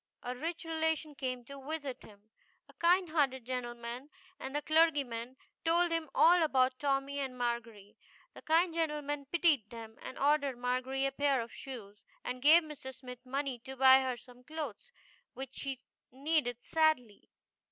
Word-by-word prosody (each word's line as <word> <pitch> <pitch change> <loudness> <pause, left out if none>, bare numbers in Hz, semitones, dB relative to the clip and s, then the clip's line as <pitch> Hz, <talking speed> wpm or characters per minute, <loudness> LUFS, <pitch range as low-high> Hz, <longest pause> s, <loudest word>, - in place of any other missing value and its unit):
A 250 +1 -3
rich 330 +6 -4
relation 320 -1 -1
came 255 -3 -4
to 275 +1 -10
visit 290 -5 -4
him 210 +1 -17 0.4
a - - -18
kind 355 +1 +3
hearted 270 -6 +1
gentleman 240 +1 -5 0.3
and 265 +2 -6
the 295 - +1
clergyman 275 -7 +2 0.3
told 340 +1 +3
him 330 -2 -1
all 350 +1 +6
about 260 -4 +2
Tommy 280 0 0
and 265 -2 -4
Margery. 230 -4 -3 0.4
The - - -12
kind 330 +2 +3
gentleman 295 -3 -2
pitied 310 - +3
them, 225 -1 -9
and - - -8
ordered 285 -2 +2
Margery 255 +2 -1
a 275 - +1
pair 280 -1 +2
of 230 0 -5
shoes 210 -6 -9 0.2
and 250 0 -4
gave 320 +5 +7
Mr. 300 -4 -8
Smith 250 -1 -10
money 270 -1 -2
to 265 +3 -9
buy 265 0 +7
her 255 -2 -2
some 250 +1 -16
clothes, 310 - -6 0.4
which 265 0 -6
she 265 -2 -5 0.3
needed 265 -3 0
sadly. 310 -10 +1
270 Hz, 160 wpm, -33 LUFS, 250-310 Hz, 0.4 s, gave